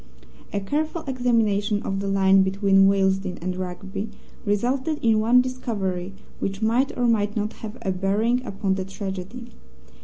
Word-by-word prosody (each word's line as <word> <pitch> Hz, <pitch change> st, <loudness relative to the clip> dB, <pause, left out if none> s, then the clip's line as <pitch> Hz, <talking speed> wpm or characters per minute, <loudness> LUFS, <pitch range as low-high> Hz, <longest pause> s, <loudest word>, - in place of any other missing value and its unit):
A 200 Hz, -, -1 dB
careful 310 Hz, -, -2 dB
examination 225 Hz, -5 st, +1 dB
of 195 Hz, 0 st, -2 dB
the 200 Hz, -, -3 dB
line 195 Hz, 0 st, +4 dB
between 195 Hz, 0 st, +4 dB
Willesden 190 Hz, -1 st, +1 dB
and 180 Hz, +2 st, -3 dB
Rugby 190 Hz, +3 st, -5 dB, 0.4 s
resulted 260 Hz, +9 st, 0 dB
in 225 Hz, -2 st, +4 dB
one 235 Hz, +3 st, +5 dB
discovery 200 Hz, -8 st, -3 dB, 0.2 s
which 195 Hz, 0 st, -3 dB
might 235 Hz, +5 st, +1 dB
or 245 Hz, -, +1 dB
might 210 Hz, -3 st, +2 dB
not 210 Hz, 0 st, -1 dB
have 220 Hz, +1 st, -6 dB
a 190 Hz, -, 0 dB
bearing 210 Hz, +7 st, +1 dB
upon 195 Hz, -4 st, -1 dB
the 190 Hz, 0 st, -2 dB
tragedy. 195 Hz, +5 st, -6 dB
205 Hz, 150 wpm, -24 LUFS, 195-235 Hz, 0.4 s, one